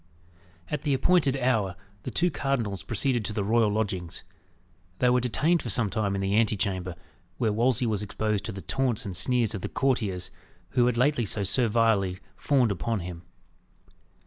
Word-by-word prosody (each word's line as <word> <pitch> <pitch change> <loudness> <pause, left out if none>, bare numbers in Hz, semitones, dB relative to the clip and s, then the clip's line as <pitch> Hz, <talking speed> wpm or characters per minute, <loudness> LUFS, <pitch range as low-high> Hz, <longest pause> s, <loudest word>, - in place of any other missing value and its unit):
At 150 -2 -2
the 145 -3 +1
appointed 140 -3 +2
hour, 110 -8 +1 0.3
the - - -5
two 175 +1 +1
cardinals, 115 - -2
proceeded 125 - 0
to 105 - -3
the 105 -2 -1
royal 110 +1 +3
lodgings. 95 -5 -3 0.7
They 125 +3 +3
were 125 - +4
detained 155 +8 +1
for - - -5
some 115 -6 +2
time 100 -1 0
in 100 - -2
the 95 +1 0
ante 110 0 +2
chamber, 95 -3 -2 0.4
where 110 -4 +1
Wolsey 120 +2 +1
was 105 -3 0
exposed 105 0 -2
to - - -3
the 95 -3 -8
taunts 130 -1 0
and 95 -3 -4
sneers 120 +3 +2
of 105 - -4
the - - -4
courtiers, 110 -9 -1 0.4
who 125 -2 +3
had 125 -1 0
lately 125 -1 +2
so 100 - -1
servilely 110 -4 +2 0.2
fawned 130 -6 +2
upon 100 +3 -2
him. 85 -1 -7
110 Hz, 175 wpm, -27 LUFS, 100-125 Hz, 0.7 s, were